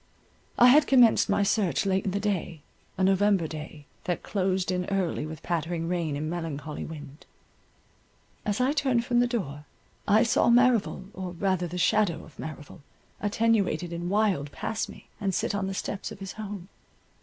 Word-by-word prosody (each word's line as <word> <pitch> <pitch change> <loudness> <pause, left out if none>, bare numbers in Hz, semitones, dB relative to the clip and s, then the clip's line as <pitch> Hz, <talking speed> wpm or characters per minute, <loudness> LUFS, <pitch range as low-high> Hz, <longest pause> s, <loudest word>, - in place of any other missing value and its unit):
I 245 - +8
had 290 +3 +6
commenced 245 -4 +5
my 200 - +3
search 200 -2 +1
late 190 -1 +1
in - - +1
the 200 +2 -1
day, 185 -6 -2 0.3
a 190 - +1
November 195 -1 +3
day, 155 -1 -8 0.2
that 175 - -2
closed 190 -2 0
in 180 0 -1
early 190 -6 -1
with 155 0 -9
pattering 165 0 -2
rain 170 -4 -1
and 150 +2 -3
melancholy 160 -3 -4
wind. 150 -2 -10 1.2
As 205 +1 -1
I 260 +3 +2
turned 265 -5 +1
from 240 -1 +2
the 245 - +4
door, 150 - -4 0.4
I 215 +3 +5
saw 230 - +3
Merrival, 235 -5 +3
or 185 -1 -5
rather 185 0 0
the 175 +2 -6
shadow 180 0 +2
of 155 - -18
Merrival, 155 0 -8 0.4
attenuated 205 -6 +1
and 170 +1 -3
wild, 195 -8 +1
pass 220 +8 -3
me, - - -13
and 195 -4 -1
sit - - 0
on 200 -1 -1
the 195 - -4
steps 195 - -4
of - - -8
his 195 -1 -7
home. 205 -3 -7
190 Hz, 175 wpm, -27 LUFS, 165-210 Hz, 1.2 s, I